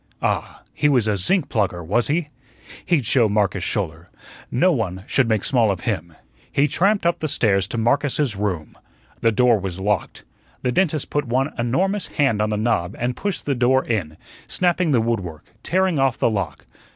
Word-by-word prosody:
Ah, - - -2
he 145 - +2
was 125 -6 +3
a 105 - +2
zinc 145 - +1
plugger, 95 -6 -1
was 110 +8 +1
he? 150 +1 0 0.5
He'd 155 -8 +1
show 115 0 +3
Marcus 100 -3 0
Schouler. 85 -5 -3 0.4
No 180 +9 +3
one 95 - -2
should 130 -3 +1
make 110 -3 +1
small 120 -5 +2
of 95 -4 -2
him. 80 0 -3 0.4
He 140 +2 +3
tramped 195 +6 +1
up 170 - +2
the 155 - -2
stairs 100 -8 +1
to 115 - -5
Marcus's 135 +1 +1
room. 95 -6 -3 0.4
The 115 - +3
door 120 0 +3
was 95 -1 -5
locked. 100 -2 -2 0.4
The 125 - +1
dentist 155 -1 0
put 145 0 0
one 130 +4 0
enormous 180 - 0
hand 135 -8 +1
on 105 - +1
the 105 - -1
knob 105 -4 0
and 125 +1 -2
pushed 200 -2 -3
the 145 - +1
door 130 +1 +2
in, 90 -10 -2 0.3
snapping 180 -1 +1
the 125 -5 +3
wood 115 0 0
work, 85 -5 -9 0.2
tearing 185 -3 +1
off 135 -3 +2
the - - +2
lock. 95 -9 -3
120 Hz, 190 wpm, -22 LUFS, 100-145 Hz, 0.5 s, was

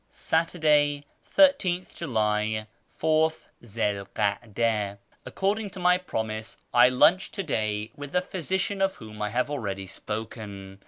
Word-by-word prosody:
Saturday, 150 -3 +1 0.3
13th 190 -12 +4
July, 110 -6 0 0.4
Ath 160 0 +2
Zi 105 -3 -1
'l 100 - -9
kada. 105 -1 0
— - - -35
According 205 +2 -1
to 190 - -9
my 180 0 +4
promise, 110 -9 -4 0.2
I 120 +1 +7
lunched 170 +9 +4
to 195 - -2
day 105 - -1
with 145 -1 -8
the 180 +2 +1
physician 190 +3 -2
of 195 0 +2
whom 110 -2 -10
I 105 - 0
have 125 +6 -1
already 100 -8 -3
sjDoken. 100 -1 -7
125 Hz, 140 wpm, -27 LUFS, 105-175 Hz, 0.4 s, I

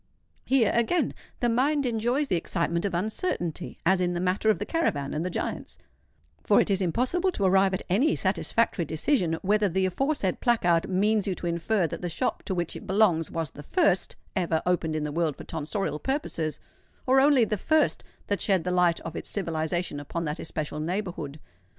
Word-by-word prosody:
Here, 255 -5 +3
again, 235 +10 +1 0.3
the 240 - +3
mind 275 +5 +2
enjoys 240 +5 0
the 185 - +1
excitement 170 +1 -1
of 190 -3 -1
uncertainty, 180 - -2
as 185 +1 +3
in 175 0 +1
the 175 - -2
matter 185 +4 +1
of 215 - +4
the - - -4
caravan 145 - -1
and 155 - -1
the 180 - -2
giants; - - -4 0.7
for 205 - +4
it - - +2
is 195 0 +2
impossible 255 - +1
to 200 - -2
arrive 190 0 +4
at - - -5
any 250 - +2
satisfactory 195 0 0
decision 165 - 0
whether 205 +1 +2
the 190 +2 +1
aforesaid 200 - 0
placard 175 -9 +2
means 205 +2 +2
you 190 - 0
to - - -7
infer 170 +3 +1
that 160 - -5
the 175 - -2
shop 250 +10 -2
to 190 - -2
which 175 -2 -2
it - - -9
belongs 190 -5 +3
was 165 -4 -3
the 145 - -10
first 185 +5 +1 0.2
ever 170 -4 0
opened 170 -3 0
in 155 - -1
the 150 - -3
world 160 -2 0
for - - -8
tonsorial 160 +1 -3
purposes, 215 - -2 0.5
or 260 +1 +5
only 270 -3 +5
the 215 - -1
first 315 +10 +1 0.2
that 200 -3 -2
shed 190 -4 +2
the 180 - -1
light 180 -2 +3
of 165 0 -7
its - - -6
civilisation 165 -3 -2
upon 165 +4 -4
that 150 0 -3
especial 150 -1 -4
neighbourhood. 170 -4 -4
185 Hz, 195 wpm, -27 LUFS, 165-220 Hz, 0.7 s, or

